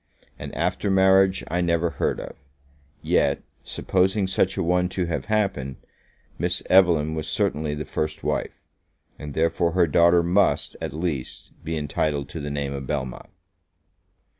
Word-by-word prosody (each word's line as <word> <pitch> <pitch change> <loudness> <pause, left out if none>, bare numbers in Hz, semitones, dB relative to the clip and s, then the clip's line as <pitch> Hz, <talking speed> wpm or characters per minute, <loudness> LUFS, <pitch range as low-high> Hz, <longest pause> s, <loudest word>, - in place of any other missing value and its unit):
An - - -6
after 100 - -1
marriage 95 0 +4
I 90 +2 -1
never 85 -1 +1
heard - - -1
of; - - -8 0.7
yet, - - +1 0.2
supposing 95 +2 0
such 95 0 0
a - - 0
one 90 +1 +1
to 90 -1 -2
have 85 -1 -3
happened, 100 -12 -1 0.6
Miss - - 0
Evelyn 85 -5 +5
was 80 -1 -3
certainly 75 0 0
the 75 0 -5
first 75 +3 -3
wife, - - -3 0.6
and 75 -2 -7
therefore 85 +1 +1
her 90 -1 +4
daughter 85 +3 +4
must, 90 +3 +2
at - - -3
least, 80 -5 -4
be 80 +1 -3
entitled 75 -1 -1
to 80 - -6
the 75 0 -4
name 70 -1 -3
of 70 -1 -6
Belmont. 65 -4 -4
85 Hz, 150 wpm, -24 LUFS, 75-90 Hz, 0.7 s, Evelyn